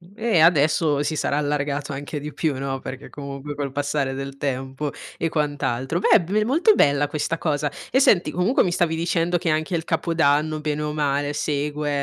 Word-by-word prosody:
e 225 -6 +1
adesso 155 -2 +4
si 155 +2 -2
sarà 145 - 0
allargato 145 0 -1
anche 145 +2 -5
di 150 +1 -7
più, 155 -5 -1
no, 135 -1 -3
perché 130 - -8
comunque 140 0 -7
col 140 -2 -3
passare 140 -1 -1
del 135 0 -6
tempo 135 +1 -3 0.3
e 165 - -1
quant'altro. 145 -1 -1
Beh, - - +1
è 215 - +7
blue 195 +5 0
è - - +3
molto 330 - +4
bella 145 0 +3
questa 155 +3 -2
cosa. 145 -3 -1 0.2
E 260 - +4
senti, 180 - +4
comunque 180 - +2
mi 180 - 0
stavi 175 -2 +1
dicendo 170 +1 +1
che 175 -1 -2
anche 155 +3 0
il 165 0 -2
Capodanno, 155 -2 +1
bene 150 0 -2
o 150 - -2
male, 145 -1 0
segue, 150 0 -2
150 Hz, 195 wpm, -23 LUFS, 140-165 Hz, 0.3 s, è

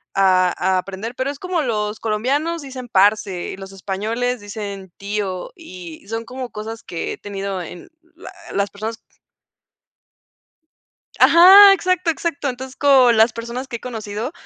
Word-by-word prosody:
a 185 -2 +3
a 185 +1 +1
aprender, 195 +6 -6
pero 260 +2 -2
es 285 - -10
como 365 -3 -1
los 215 -4 -2
colombianos 275 +10 -1
dicen 255 -2 -8
parse, 200 -2 +2
y - - -8
los 195 0 -10
españoles 220 +6 -3
dicen 200 -3 -7
tío, 200 -2 -4
y 185 - -11
son 225 +1 -4
como 255 -1 -7
cosas 220 +2 -7
que 165 - -5
he - - -9
tenido 195 -2 -5
en 175 - -10 0.3
la 370 +2 -11 0.2
las 200 0 0
personas 220 +2 -6 2.2
Ajá, 385 +4 +9
exacto 365 -2 +1
exacto. 285 -2 -3
Entonces 260 +1 -7
con 260 -4 +5
las 225 +1 +5
personas 235 +3 -6
que 235 -4 -5
he - - -24
conocido, 225 +1 -5
225 Hz, 150 wpm, -20 LUFS, 200-265 Hz, 2.2 s, Ajá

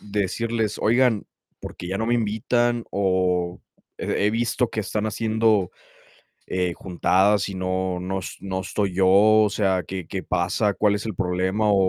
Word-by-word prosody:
decirles: 105 +2 -2
"Oigan, 120 -2 +2 0.3
¿por - - -8
qué 90 - -7
ya 95 +1 -2
no 110 - -1
me 120 - +2
invitan?, 120 +2 0
o 90 -2 0 0.4
he 100 - 0
he - - +3
visto 120 +1 0
que 110 - -2
están 105 +1 -3
haciendo, 110 -3 +1 0.8
eh, 90 -1 -1
juntadas 95 +4 +1
y 95 - -6
no 95 0 -2
no 95 +1 -3
es - - -7
no 95 -1 -3
estoy 95 0 -2
yo, 95 0 +3
o 105 +2 +5
sea, 95 -4 0
qué 95 -3 -5
qué 95 +2 -4
pasa, 90 +4 0
cuál 105 +1 +2
es 105 - -5
el 110 -5 -4
problema", 95 +3 0
o - - +4
100 Hz, 170 wpm, -23 LUFS, 95-110 Hz, 0.8 s, o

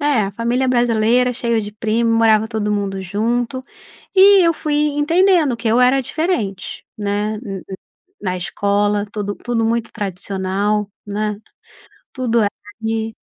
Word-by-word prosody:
É, 290 -6 +2
a 195 - -4
família 235 +5 0
brasileira, 240 0 +2
cheio 235 -2 0
de 205 -1 -7
primo, 225 +2 0
morava 220 -1 +4
todo 220 -2 -2
mundo 200 -2 -2
junto, 235 +7 -1 0.5
e 385 -2 +7
eu 335 - +3
fui 305 -1 -3 0.2
entendendo 330 -3 +3
que 230 - -6
eu 230 +3 +3
era 255 +2 +4
diferente, 260 - -3
né, 205 +1 -1
n 195 -5 -6
n 190 - -6 0.4
na 185 -2 -2
escola 205 +3 0
tudo 205 -1 -3
tudo 235 -2 -2
muito 230 0 -1
tradicional, 200 +1 -2 0.2
né, 210 0 -2 0.8
tudo 240 -3 0
era 205 -2 +2 0.3
ali. 225 0 -2
225 Hz, 145 wpm, -19 LUFS, 205-250 Hz, 0.8 s, e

